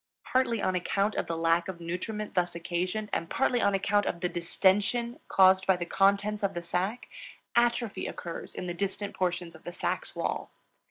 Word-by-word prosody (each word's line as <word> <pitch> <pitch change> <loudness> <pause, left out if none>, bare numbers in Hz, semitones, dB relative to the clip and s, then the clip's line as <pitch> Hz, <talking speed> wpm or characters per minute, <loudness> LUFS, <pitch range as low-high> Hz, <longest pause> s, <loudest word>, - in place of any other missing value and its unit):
Partly 240 -4 +1
on 185 - +2
account 195 +3 0
of - - -2
the 165 - -2
lack 165 +1 +2
of 185 -3 -6
nutriment 185 +5 -4
thus 175 -1 +1
occasioned 180 +5 -2
and 165 - -1
partly 250 -3 +2
on 200 -2 +3
account 205 +1 +2
of 170 - -2
the 180 - +1
distention 200 +7 +1
caused 190 0 +5
by 190 -1 +4
the 175 - -3
contents 200 +3 +2
of 200 -1 0
the 175 - -3
sac, 185 +7 -2 0.5
atrophy 235 -2 +1
occurs 170 -1 -6
in - - -4
the 175 - -3
distant 200 +2 -3
portions 175 -2 -1
of 160 - -14
the 175 - -6
sac's - - -3
wall. - - -2
190 Hz, 185 wpm, -29 LUFS, 175-210 Hz, 0.5 s, caused